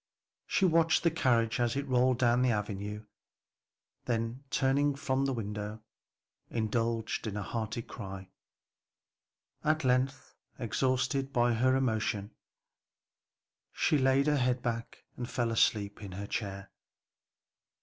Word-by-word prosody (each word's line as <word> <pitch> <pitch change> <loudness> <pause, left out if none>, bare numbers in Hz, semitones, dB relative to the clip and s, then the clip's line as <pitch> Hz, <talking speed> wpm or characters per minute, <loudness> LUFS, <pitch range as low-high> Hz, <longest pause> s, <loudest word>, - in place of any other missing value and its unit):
She 195 - +2
watched 165 -2 +3
the 170 - +4
carriage 115 -7 +2
as 120 0 +1
it 140 0 -2
rolled 130 -1 +3
down 120 0 +3
the 130 - +3
avenue, 105 -1 -3 1.0
then 115 +2 -2
turning 140 +1 +2
from 135 -1 0
the 135 - +1
window, 105 -1 -5 0.7
indulged 115 0 -1
in 105 -1 -3
a 105 - -2
hearty 115 +2 -3
cry. 95 -5 -8 1.3
At 155 0 +2
length, 130 +2 0 0.2
exhausted 130 +3 0
by 120 -2 +3
her 130 +3 +3
emotion, 110 -5 0 1.4
she 150 - +2
laid 135 +1 +3
her 150 -1 +3
head 125 -1 +1
back 115 -1 -4
and 120 -1 -4
fell 120 -2 0
asleep 105 -3 +1
in 100 -3 -7
her 100 +2 -5
chair. 100 -2 -4
120 Hz, 125 wpm, -31 LUFS, 110-130 Hz, 1.4 s, the